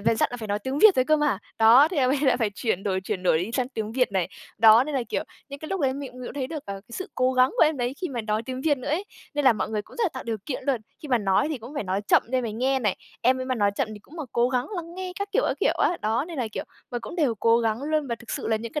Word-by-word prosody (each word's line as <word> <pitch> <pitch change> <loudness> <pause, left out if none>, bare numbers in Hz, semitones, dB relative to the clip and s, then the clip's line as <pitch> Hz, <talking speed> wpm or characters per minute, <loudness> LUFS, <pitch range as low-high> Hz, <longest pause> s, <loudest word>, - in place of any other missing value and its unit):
về 220 +2 +2
dặn - - +2
là - - -3
phải 220 -3 -7
nói 205 0 0
tiếng 260 +7 -3
Việt 430 0 +8
rồi 255 - +4
cơ 310 +3 +4
mà." 295 -9 +1 0.2
Đó, 235 +7 +7
thế 360 - -5
em 255 -3 +3
ấy 280 - +2
lại 265 -3 +4
phải 225 -4 0
chuyển 205 -4 -1
đổi 190 -2 -1
chuyển 190 -1 -4
đổi 175 -3 +3
đi 180 +6 -3
sang 255 0 0
tiếng 220 -4 -4
Việt 250 -4 +1
này. 185 -3 0 0.3
Đó, 225 +2 +7
nên 300 0 -4
là, 265 - +1
kiểu, - - -1 0.3
những 280 0 -7
cái 310 - -8
lúc 385 -1 -2
đấy 265 -2 +2
mình 275 -1 -6
cũng 250 0 -12
mình 250 - -6
cũng - - -9
thấy 270 -3 -2
được, 300 0 -7
ờ, 200 - -4
cái 195 +1 -12
sự 375 - -5
cố 255 +1 +2
gắng 255 0 +4
của - - +5
em 310 -1 +1
đấy 245 0 -2
khi 365 - -2
mà 245 -3 -3
nói 215 0 -1
tiếng 255 +2 -5
Việt 290 -1 +2
nữa 255 - -6
ấy. 320 +7 0 0.3
Nên 290 -1 0
là 260 - +7
mọi 215 - -3
người 215 -1 -1
cũng - - -17
rất 475 - +1
là - - +3
tạo 260 - -6
điều 230 -1 -2
kiện 270 - -3
luôn, 265 -5 +1 0.2
khi 300 - -7
mà 250 -3 +3
nói 200 +6 +2
thì 305 -4 -3
cũng 240 +6 -10
phải 285 - -2
nói 190 +1 -1
chậm - - +5
để 260 +1 +1
em 250 - -2
ấy 220 - -3
nghe 260 +4 +1
này, 210 -7 0 0.3
em 255 +2 +3
ấy - - -2
mà 260 - 0
nói 205 -4 +2
chậm 265 - 0
thì 210 - -9
cũng 285 +10 -16
mà 320 - -4
cố 240 +1 +3
gắng 250 0 0
lắng 340 0 -6
nghe 370 0 -5
các 400 0 -3
kiểu, - - +3
các - - -1
kiểu - - +3
á. 350 - +2
Đó, 225 +5 +1
nên 330 -4 -6
là, 240 -3 -1
kiểu - - -4 0.3
mà, 245 - -2
cũng 235 +9 -8
đều 285 -9 +2
cố 230 +2 +3
gắng 225 +1 -1
luôn 305 0 0
và 235 - -2
thực 235 0 -12
sự - - -3
là 220 - +2
những 225 +1 -6
cái 300 - -2
255 Hz, 355 wpm, -25 LUFS, 220-285 Hz, 0.3 s, Việt